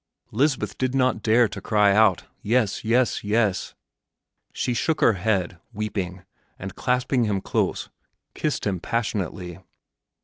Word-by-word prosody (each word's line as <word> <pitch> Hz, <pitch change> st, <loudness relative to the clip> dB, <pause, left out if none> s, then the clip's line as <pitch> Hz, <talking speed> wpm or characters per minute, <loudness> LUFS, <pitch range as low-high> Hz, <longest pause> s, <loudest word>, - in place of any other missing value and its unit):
Lisbeth 125 Hz, -4 st, 0 dB
did 130 Hz, 0 st, 0 dB
not 130 Hz, -4 st, +2 dB
dare 115 Hz, +2 st, +4 dB
to 100 Hz, -1 st, -8 dB
cry 105 Hz, -1 st, +3 dB
out, 105 Hz, -3 st, +4 dB, 0.2 s
"Yes, 110 Hz, -2 st, +1 dB
yes, 120 Hz, +2 st, +1 dB
yes!" 105 Hz, -2 st, 0 dB, 0.8 s
She 125 Hz, -, -2 dB
shook 155 Hz, +7 st, 0 dB
her 115 Hz, -, +5 dB
head, 95 Hz, -2 st, -1 dB
weeping, 95 Hz, -4 st, -4 dB, 0.3 s
and, 95 Hz, +1 st, -7 dB
clasping 125 Hz, +1 st, 0 dB
him 100 Hz, -2 st, 0 dB
close, -, -, -2 dB, 0.4 s
kissed 155 Hz, -2 st, -2 dB
him 95 Hz, -3 st, -1 dB
passionately. 95 Hz, -6 st, -3 dB
110 Hz, 130 wpm, -24 LUFS, 95-120 Hz, 0.8 s, her